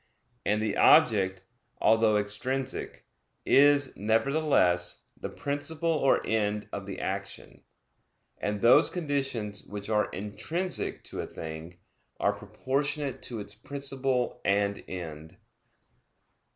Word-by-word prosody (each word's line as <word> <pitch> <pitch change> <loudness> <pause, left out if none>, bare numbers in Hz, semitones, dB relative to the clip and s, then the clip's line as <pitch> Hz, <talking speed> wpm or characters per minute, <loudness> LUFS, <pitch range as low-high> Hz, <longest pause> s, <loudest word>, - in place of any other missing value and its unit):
And 105 +1 +1
the 105 -2 -1
object, 95 -5 +4 0.3
although 110 -1 +4
extrinsic, 130 +6 -2 0.4
is, 140 -1 +5
nevertheless, 110 - +2
the - - -6
principle 155 +4 -2
or 150 -4 +2
end 105 -1 0
of 100 -1 -5
the 100 - -6
action; 100 +1 -5 0.8
and 105 0 -2
those 125 +7 +7
conditions 135 - -2
which 100 0 -7
are 105 -1 +2
intrinsic 115 - -3
to - - -6
a - - -6
thing, 80 +2 -8 0.4
are 100 - +2
proportionate 135 +7 -3
to 120 -3 -5
its 100 - -9
principle 135 +1 -2
and 100 0 +1
end. 80 -4 -7
110 Hz, 110 wpm, -28 LUFS, 100-140 Hz, 0.8 s, those